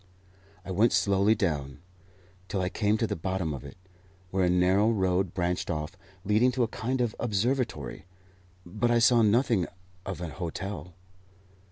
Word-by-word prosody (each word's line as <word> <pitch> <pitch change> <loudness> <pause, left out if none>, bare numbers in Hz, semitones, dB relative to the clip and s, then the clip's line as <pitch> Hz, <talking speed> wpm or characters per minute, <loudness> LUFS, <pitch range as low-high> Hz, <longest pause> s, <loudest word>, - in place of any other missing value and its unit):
I 95 - -5
went 105 +5 +3
slowly 100 +3 +3
down, 75 - -2 0.7
till 95 - -2
I 90 0 0
came 105 +1 +1
to 115 - +1
the - - -2
bottom 90 -2 -2
of 70 - -7
it, 70 +2 -11 0.5
where 95 0 +1
a 90 - +3
narrow 90 +4 +3
road 95 -4 0
branched 90 -1 -1
off, 75 +1 -3 0.3
leading 105 +5 +3
to 125 -1 +1
a - - +1
kind 125 +3 -2
of 120 -2 0
observatory; 115 - -1 0.6
but 105 +7 -1
I 120 - +4
saw 120 0 +5
nothing 110 -3 +3 0.4
of 95 -2 -5
an 85 -2 -5
hotel. 90 +3 -6
95 Hz, 160 wpm, -28 LUFS, 90-110 Hz, 0.7 s, saw